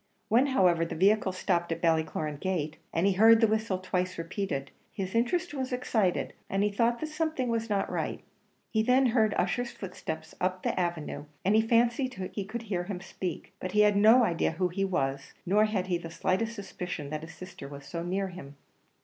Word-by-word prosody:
When, 245 +6 +4
however, 180 -10 +3
the 165 - -4
vehicle 195 +3 +3
stopped 175 -2 0
at 165 - -1
Ballycloran 160 -3 0
gate, 160 -5 -2
and 165 +3 +1
he 200 - +4
heard 220 +4 +7
the 225 - +5
whistle 220 -3 0
twice 185 0 -2
repeated, 165 -5 -3 0.2
his 190 -3 -4
interest 295 +10 +1
was 265 -2 -3
excited, 220 -7 0 0.2
and 195 +1 +1
he 210 - +2
thought 235 +3 +1
that 315 - -2
something 310 -5 -1
was 230 0 -1
not 200 -2 +1
right. - - -3 0.5
He 220 - +2
then 255 +4 +4
heard 220 -3 +3
Ussher's 235 +7 0
footsteps 160 -6 -6
up 185 0 -1
the - - 0
avenue, 165 -4 -2 0.2
and 200 +3 +4
he 220 - +6
fancied 235 +3 +2 0.2
he 200 - -3
could 235 +3 -5
hear 185 -5 -2
him 195 -2 -4
speak; 185 -2 -6
but 185 0 -5
he 210 - +5
had 210 -1 +5
no 220 +5 +7
idea 170 -6 +1
who 180 +2 0
he 195 +3 -2
was; 140 -8 -1
nor 205 +4 +4
had 205 -4 -1
he 180 -2 0
the 165 - -7
slightest 220 +7 -1
suspicion 180 -7 -6
that 155 0 -3
his 160 - -10
sister 185 -6 -9
was 140 0 -10
so 170 +4 -5
near 190 +3 -1
him. 145 -6 -10
190 Hz, 200 wpm, -29 LUFS, 175-225 Hz, 0.5 s, heard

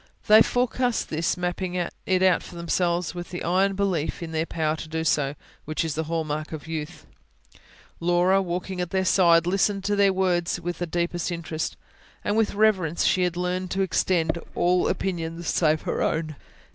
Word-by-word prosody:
They 215 0 +8
forecast 245 0 +1
this, 160 +3 -1
mapping 180 +1 -2
it 180 +1 -1
out 185 -2 +4
for - - -11
themselves 170 +1 0
with 175 -1 -7
the 175 - -5
iron 190 +3 +2
belief 185 -5 -1
in 165 - -6
their 160 +1 -1
power 155 -1 -1
to 160 - -7
do 160 0 -2
so, 145 -3 +1 0.3
which 155 +2 -2
is 160 - -2
the 160 +1 -2
hall 165 0 -1
mark 155 0 -4
of 155 -1 -7
youth. 155 -2 -6 0.9
Laura, 175 +3 +3
walking 180 0 -3
at 180 - -3
their 190 0 0
side, 170 -3 +5
listened 195 +2 +1
to 205 +1 0
their 200 -1 +4
words 180 -2 0
with 175 0 -4
the 175 - -2
deepest 175 +1 -2
interest, 165 -2 -4 0.5
and 205 - 0
with 220 -1 +3
the - - -8
reverence 190 -7 +2
she 185 - +3
had 175 -1 0
learned 180 +1 -2
to 195 +1 0
extend 175 -3 +1
to 170 - -8
all 180 +1 +2
opinions 170 -2 -3
save 155 -2 +2
her - - -2
own. 155 -1 -1
175 Hz, 190 wpm, -25 LUFS, 165-190 Hz, 0.9 s, They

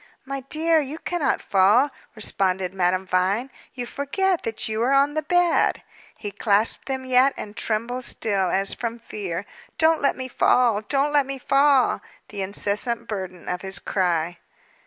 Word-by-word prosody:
"My 275 0 -4
dear, 315 +5 +1
you 295 +1 -4
cannot 335 -3 -1
fall," 210 +9 +4 0.2
responded 190 -3 -1
Madame 185 0 +1
Vine. 190 +8 0 0.2
"You 245 -1 -4
forget 350 +9 -1
that 225 -1 -3
you 220 0 -2
are 255 +4 +2
on 280 +1 +3
the 310 - 0
bed." 350 +2 +2 0.3
He 205 - -6
clasped 205 +2 +1
them 265 -1 -3
yet, 255 +2 +4
and 210 0 -7
trembled 235 +4 -2
still, 195 -4 +1
as 195 +2 0
from 235 -1 -4
fear. 200 -5 -5 0.3
"Don't 320 0 +3
let 280 - +1
me 260 0 -4
fall! 240 -4 +3
Don't 280 +6 0
let 285 -2 +3
me 275 0 -3
fall" 275 0 +3 0.3
the 205 -2 -5
incessant 210 +4 -2
burden 185 -4 -6
of 180 0 -3
his 190 -1 -4
cry. 175 -3 -1
235 Hz, 160 wpm, -23 LUFS, 195-275 Hz, 0.3 s, fall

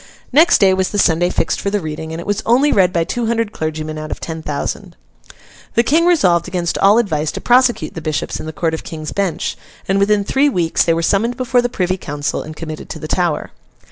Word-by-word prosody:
Next 320 +5 +6
day 195 -2 +4
was 190 0 0
the 205 - -3
Sunday 175 -2 +3
fixed 165 - -1
for 200 - -1
the 205 +1 0
reading, 160 -1 -6
and 160 - -5
it 170 - -7
was 205 +1 -1
only 260 +6 +3
read 185 -3 +3
by 170 -2 +1
two 230 +7 -2
hundred 230 -2 0
clergymen 155 -2 -4
out 155 0 -6
of - - -5
ten 160 -1 -6
thousand. 145 -2 -4 0.8
The 235 - +4
King 325 +7 +3
resolved 185 - +3
against 175 -2 -2
all 200 +3 +5
advice 155 -10 0
to - - -4
prosecute 245 -9 +2
the 165 - -6
bishops 155 -1 -3
in - - -7
the - - -4
Court 160 +1 -1
of 160 - -4
King's 155 -2 -6
Bench, 195 -4 -2 0.3
and 195 +1 +2
within 205 +1 +2
three 270 +7 +2
weeks 170 -10 +1
they 165 - +2
were 165 - -1
summoned 225 +7 +1
before 250 -1 +2
the 245 - -1
Privy 185 -5 -1
Council, 145 -4 -3
and 155 - -9
committed 155 -1 -7
to - - -6
the 155 - -7
Tower. 175 -2 -1
180 Hz, 235 wpm, -17 LUFS, 160-225 Hz, 0.8 s, Next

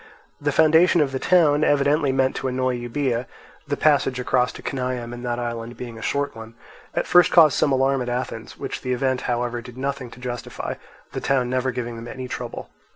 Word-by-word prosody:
The 145 0 +1
foundation 160 +4 +5
of 145 -3 +2
this 130 - -3
town, 155 -5 +4
evidently 145 0 +3
meant 130 0 +1
to 135 - -2
annoy 130 0 0
Euboea 120 0 -2 0.4
(the - - -1
passage 140 -4 +2
across 125 -1 +1
to - - -11
Cenaeum 125 -2 -3
in 120 - -7
that 120 -1 -2
island 120 0 -5
being 120 -2 -7
a - - -10
short 140 +1 -1
one), 115 0 -10 0.4
at - - 0
first 180 0 +5
caused 160 -5 +7
some 145 - +2
alarm 135 0 +2
at 125 - -3
Athens, 120 -2 -4
which - - -5
the 125 -1 -1
event 130 0 0
however 120 0 -1
did 125 +1 -12
nothing 135 -1 -3
to 115 - -14
justify, 125 -1 -5 0.4
the - - -4
town 130 -2 +1
never 130 0 0
giving 120 -2 -4
them 115 +1 -8
any 130 +1 -6
trouble. - - -6
130 Hz, 205 wpm, -23 LUFS, 120-140 Hz, 0.4 s, caused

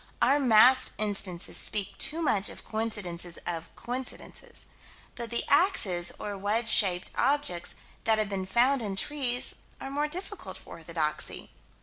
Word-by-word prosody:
Our 285 - +4
massed 255 0 +6
instances 200 -4 -2
speak 205 -2 -2
too 330 +2 +1
much 205 -9 +2
of - - -10
coincidences 180 -6 -4
of 165 -2 -4
coincidences. 250 +1 -6 0.5
But 235 -2 -6
the 235 - 0
axes, 200 - +3
or 205 -1 -5
wedge 220 +4 0
shaped 185 -5 +4
objects 275 -12 +1 0.3
that 220 -1 +4
have 215 -1 0
been 195 -2 -4
found 250 +6 +3
in 200 -3 -3
trees, 250 +2 0 0.2
are 270 - -7
more 295 +2 0
difficult 370 +6 -4
for - - -15
orthodoxy. - - -2
220 Hz, 140 wpm, -28 LUFS, 195-270 Hz, 0.5 s, massed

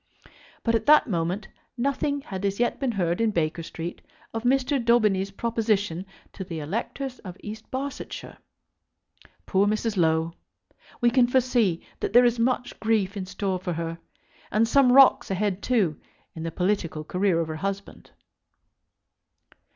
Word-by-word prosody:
But, 230 - +1
at 230 - 0
that 300 +1 +7
moment, 180 +1 -2 0.3
nothing 280 +3 0
had 190 -7 -6
as 200 +1 -1
yet 240 - +1
been 265 -4 0
heard 175 -1 0
in 225 - +3
Baker 165 -4 -1
Street 165 +1 -6 0.3
of 225 - -2
Mr. 265 +2 +1
Daubeny's 210 -5 +3
proposition 205 -4 -1 0.3
to 190 - -6
the 175 -3 -6
electors 235 - -4
of 185 -2 -9
East 215 +1 -8
Barsetshire! 270 +1 -6 1.1
Poor 195 +1 +2
Mrs. 215 0 -1
Low! 160 -1 +2 0.7
We 240 0 +4
can 245 0 +4
foresee 240 -8 +1
that - - -3
there 245 +1 +7
is 240 -1 +2
much 250 +1 0
grief 215 -3 +1
in 190 -2 -4
store 185 0 -2
for 180 -1 -3
her, 165 0 -4 0.5
and 225 +2 +2
some 255 +1 +5
rocks 270 +1 +6
ahead, 195 0 -1
too, 200 - +1 0.3
in 160 - -8
the 165 0 -3
political 180 -4 -1
career 180 +1 +1
of 165 - -1
her 155 0 -5
husband. 195 +3 -5
205 Hz, 150 wpm, -25 LUFS, 180-240 Hz, 1.1 s, that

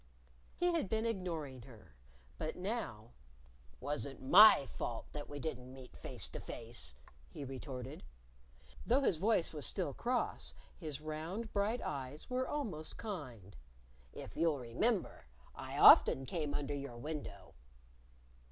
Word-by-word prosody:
He 355 0 +2
had 320 - 0
been 220 0 0
ignoring 165 - -3
her. 110 - -15 0.4
But 155 0 -3
now, 180 - -4 0.7
"Wasn't 140 0 -3
my 180 +2 +8
fault 115 -3 -4
that 145 -1 -6
we 145 - -6
didn't 130 -4 -5
meet 130 -1 -12
face - - -5
to - - -6
face," 115 - -5 0.3
he 140 - -7
retorted. 130 -1 -6 0.8
Though 260 +4 +3
his 190 - +2
voice 195 -2 +2
was 150 -2 -5
still - - -2
cross, 65 0 -1 0.2
his 150 -2 -6
round, 160 +9 -5
bright 210 +4 0
eyes 140 - -5
were 255 +1 0
almost 190 - -3
kind. 130 - -7 0.6
"If - - -9
you'll 165 -3 +2
remember 135 - -1 0.3
I - - -6
often 135 - +8
came 150 +1 -2
under 145 0 -2
your 140 -4 -5
window." 120 -8 -6
150 Hz, 135 wpm, -36 LUFS, 125-195 Hz, 0.8 s, my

